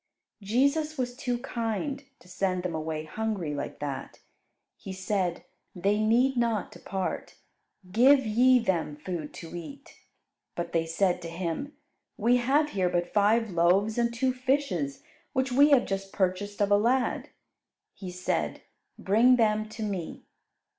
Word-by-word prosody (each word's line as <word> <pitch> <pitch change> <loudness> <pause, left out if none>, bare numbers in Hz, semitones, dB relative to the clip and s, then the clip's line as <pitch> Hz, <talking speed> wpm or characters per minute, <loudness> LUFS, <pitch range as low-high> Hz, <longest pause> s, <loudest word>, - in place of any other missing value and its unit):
Jesus 280 +9 +1
was 245 -1 -2
too 250 -2 -2
kind 245 +3 -3
to - - -21
send 185 0 -1
them 180 -2 -2
away 155 0 -3
hungry 190 -1 -3
like 145 - -5
that. 140 -2 -5 0.6
He 195 - -8
said, 190 -2 -1 0.3
"They 200 +4 +1
need 240 +5 +3
not 230 -4 0
depart; 190 -1 -4 0.6
give 265 +5 +5
ye 250 +4 +5
them 180 -10 -1
food 155 0 -5
to 165 0 -9
eat." 275 +12 -10 0.6
But 170 -1 -4
they 165 -1 +1
said 175 +2 +1
to 165 - -6
Him, 170 - -4 0.4
"We 240 +4 +3
have 285 +5 +2
here 185 -2 +1
but 175 0 -1
five 215 +1 +3
loaves 185 +6 +2
and 235 0 +2
two 255 +2 0
fishes, 255 - -1 0.3
which 260 0 0
we 285 +4 +6
have 275 -4 +5
just 195 0 -4
purchased 200 +2 -1
of 205 - 0
a 205 - +7
lad." 245 +4 +1 0.6
He 190 - -8
said, 180 0 -2 0.3
"Bring 230 +6 +4
them 215 -2 +1
to 220 0 -6
Me." 195 -6 -4
210 Hz, 145 wpm, -28 LUFS, 180-245 Hz, 0.6 s, a